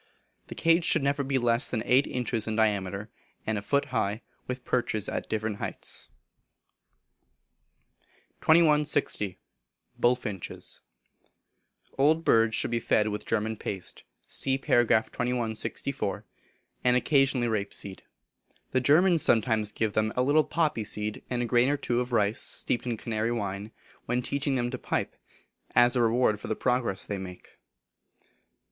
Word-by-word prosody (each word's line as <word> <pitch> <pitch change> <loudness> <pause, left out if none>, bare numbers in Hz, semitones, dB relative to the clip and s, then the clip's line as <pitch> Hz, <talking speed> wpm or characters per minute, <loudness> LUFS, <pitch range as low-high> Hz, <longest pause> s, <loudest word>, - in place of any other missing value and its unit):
The - - -8
cage 165 +1 +3
should 160 -3 +4
never 140 +1 +1
be 135 0 0
less 120 0 +2
than 110 -3 -2
eight 130 +3 +3
inches 120 -3 -2
in 110 - -2
diameter, 100 -1 0 0.3
and 110 - -1
a 100 - -2
foot 140 +7 +1
high, 105 +4 -1 0.2
with 125 0 -5
perches 110 -4 -1
at - - -4
different 110 -1 -2
heights. - - -5 2.3
2160. 150 - +3 0.6
Bullfinches. 120 -7 -2 1.2
Old 155 +4 +3
birds 115 -1 +4
should - - 0
be 120 - +1
fed 110 -1 +1
with 105 0 -5
German 110 0 -1
Paste, 95 -3 -6 0.2
(See 135 0 0
par. 120 -2 +3
2164), 115 0 -1 0.6
and 125 0 +4
occasionally 135 -3 +2
rapeseed. 100 -3 -3 0.7
The 130 - +2
Germans 165 +5 +4
sometimes 110 -3 +2
give 110 -2 -1
them 110 0 0
a 125 - +2
little 145 +4 +4
poppy 155 -10 0
seed, 105 0 -3
and 120 -1 -1
a - - -1
grain 120 +2 +3
or 145 - +1
two 120 -3 -1
of 125 0 -3
rice, 105 -2 +2
steeped 120 - 0
in 120 -2 -1
Canary 115 +1 -2
wine, 100 -2 -4 0.4
when 125 +1 0
teaching 140 +1 -1
them 120 -1 -1
to 125 - -5
pipe, - - -2 0.6
as 120 +1 +5
a 125 - +3
reward 115 -2 +2
for - - -8
the 110 - -1
progress 125 -6 0
they 100 -1 -4
make. 90 -1 -11
120 Hz, 145 wpm, -28 LUFS, 110-130 Hz, 2.3 s, as